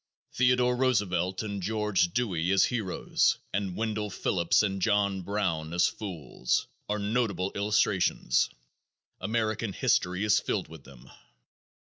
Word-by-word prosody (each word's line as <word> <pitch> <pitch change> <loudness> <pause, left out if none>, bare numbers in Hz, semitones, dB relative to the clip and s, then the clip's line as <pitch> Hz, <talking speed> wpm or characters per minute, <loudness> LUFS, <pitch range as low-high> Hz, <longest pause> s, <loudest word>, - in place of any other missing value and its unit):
Theodore 125 0 +3
Roosevelt 95 -7 0
and 100 -2 -4
George 105 -3 +1
Dewey 90 -7 -1
as 95 -1 +5
"heroes" 110 -7 0 0.2
and 95 -2 -2
Wendell 110 -1 -2
Phillips 90 -1 +1
and 95 -2 -2
John 100 -2 +1
Brown 85 -5 -2
as 90 - +4
"fools" 85 - -2 0.2
are 105 - 0
notable 105 -2 -1
illustrations. 105 -2 +1 0.7
American 110 -1 -1
history 90 +2 +1
is 105 0 +4
filled 95 - -2
with 80 -3 -12
them. 65 -3 -15
100 Hz, 120 wpm, -28 LUFS, 90-110 Hz, 0.7 s, as